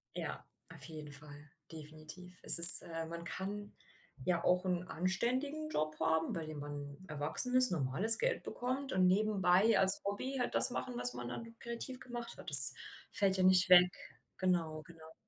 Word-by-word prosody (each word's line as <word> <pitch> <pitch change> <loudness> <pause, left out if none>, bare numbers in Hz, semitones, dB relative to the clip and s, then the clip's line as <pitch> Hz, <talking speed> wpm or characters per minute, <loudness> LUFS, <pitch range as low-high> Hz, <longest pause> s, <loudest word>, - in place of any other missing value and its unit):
Ja, - - -17 0.3
auf - - -20
jeden 155 -2 -19
Fall. 145 +1 -21 0.2
Definitiv. 155 +4 -21
Es - - +7
ist 170 +2 +11
äh, 165 -1 -16
man 170 0 -18
kann 205 +4 -17 0.5
ja 175 -2 -11
auch 180 +1 -9
'n 180 -1 -13
anständigen 255 - -13
Job 155 - -14
haben, 160 0 -11
bei 165 -2 -15
dem 155 -1 -18
man 145 +3 -19
erwachsen 155 - -4
ist, 255 -5 -1
normales 175 +9 -3
Geld - - -12
bekommt 265 +2 -15
und 185 -1 -8
nebenbei 200 +1 -8
als 190 0 +4
Hobby 255 +7 -14
halt 245 - -13
das 115 0 +1
machen, 125 -1 -15
was 125 0 -2
man 120 0 -17
dann 230 0 -19
kreativ 235 +2 -17
gemacht 240 -1 -18
hat. 185 - -24
Das 135 -1 +9 0.4
fällt 195 -3 -9
ja 185 - -10
nicht 185 0 -6
weg. 180 0 -4 0.5
Genau, 165 -4 -12
genau. 160 -1 -26
180 Hz, 175 wpm, -23 LUFS, 155-210 Hz, 0.5 s, ist